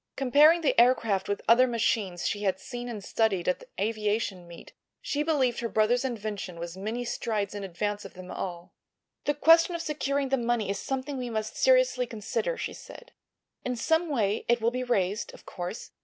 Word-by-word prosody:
Comparing 295 Hz, +6 st, +5 dB
the 300 Hz, -, +2 dB
aircraft 225 Hz, -6 st, +2 dB
with 200 Hz, -, -2 dB
other 245 Hz, +3 st, +6 dB
machines 215 Hz, -6 st, 0 dB
she 205 Hz, -, -2 dB
had 190 Hz, -2 st, 0 dB
seen 245 Hz, +5 st, -6 dB
and 215 Hz, -4 st, -6 dB
studied 195 Hz, -5 st, 0 dB
at 180 Hz, -, +1 dB
the -, -, -15 dB
aviation 210 Hz, -3 st, -1 dB
meet 170 Hz, 0 st, -12 dB, 0.3 s
she 290 Hz, -, -2 dB
believed 280 Hz, -6 st, +1 dB
her 235 Hz, -, -2 dB
brother's 220 Hz, +4 st, +2 dB
invention 210 Hz, -7 st, -4 dB
was 170 Hz, +1 st, -6 dB
many 220 Hz, +6 st, -4 dB
strides 215 Hz, -4 st, -2 dB
in 205 Hz, -1 st, -5 dB
advance 205 Hz, +3 st, -3 dB
of -, -, -11 dB
them 185 Hz, 0 st, -9 dB
all. 175 Hz, -2 st, -6 dB, 0.5 s
"The 290 Hz, -, +1 dB
question 330 Hz, +3 st, +5 dB
of 340 Hz, -, -3 dB
securing 280 Hz, -3 st, -1 dB
the 270 Hz, -, +2 dB
money 235 Hz, -4 st, 0 dB
is 200 Hz, -, -3 dB
something 270 Hz, +1 st, -3 dB
we 250 Hz, -1 st, -4 dB
must 220 Hz, -1 st, -3 dB
seriously -, -, +3 dB
consider," 235 Hz, -, -3 dB
she -, -, -4 dB
said. -, -, -12 dB, 0.5 s
"In 250 Hz, 0 st, -2 dB
some 320 Hz, +7 st, +1 dB
way 215 Hz, -7 st, 0 dB
it 240 Hz, 0 st, +3 dB
will 230 Hz, +1 st, +1 dB
be 255 Hz, +1 st, -2 dB
raised, 205 Hz, -3 st, -1 dB
of -, -, -17 dB
course. 180 Hz, +5 st, -6 dB
230 Hz, 190 wpm, -28 LUFS, 200-265 Hz, 0.5 s, other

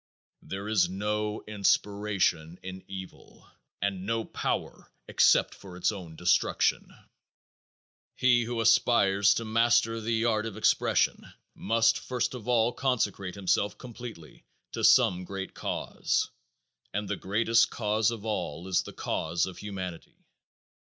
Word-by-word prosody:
There 100 Hz, +2 st, -6 dB
is 100 Hz, -5 st, +2 dB
no 105 Hz, +2 st, -2 dB
inspiration 100 Hz, -5 st, 0 dB
in 95 Hz, 0 st, -8 dB
evil 95 Hz, -2 st, -10 dB, 0.4 s
and 100 Hz, -2 st, -1 dB
no 115 Hz, 0 st, -1 dB
power -, -, -4 dB, 0.2 s
except -, -, +4 dB
for 95 Hz, -2 st, -12 dB
its 90 Hz, -, +1 dB
own 90 Hz, -6 st, -9 dB
destruction. 90 Hz, +2 st, +1 dB, 1.2 s
He 125 Hz, -2 st, +3 dB
who 120 Hz, 0 st, -2 dB
aspires 100 Hz, -4 st, +4 dB
to 115 Hz, -, -2 dB
master 115 Hz, 0 st, +2 dB
the 115 Hz, +1 st, 0 dB
art 110 Hz, -1 st, +1 dB
of 105 Hz, -, -7 dB
expression -, -, +1 dB, 0.2 s
must 115 Hz, +2 st, +2 dB
first 125 Hz, -1 st, -2 dB
of 125 Hz, -3 st, -8 dB
all 120 Hz, -1 st, +2 dB
consecrate 105 Hz, -8 st, -1 dB
himself 100 Hz, 0 st, 0 dB
completely 115 Hz, -, -10 dB, 0.3 s
to -, -, -5 dB
some 90 Hz, 0 st, +5 dB
great 95 Hz, 0 st, -6 dB
cause, -, -, -2 dB, 0.6 s
and 105 Hz, +1 st, -3 dB
the -, -, -1 dB
greatest 115 Hz, +4 st, +2 dB
cause 110 Hz, 0 st, +1 dB
of 115 Hz, -2 st, -6 dB
all 90 Hz, -5 st, -3 dB
is 95 Hz, -2 st, +2 dB
the -, -, -10 dB
cause 85 Hz, +2 st, -1 dB
of 90 Hz, -2 st, -8 dB
humanity. 95 Hz, -4 st, -7 dB
105 Hz, 130 wpm, -28 LUFS, 95-115 Hz, 1.2 s, some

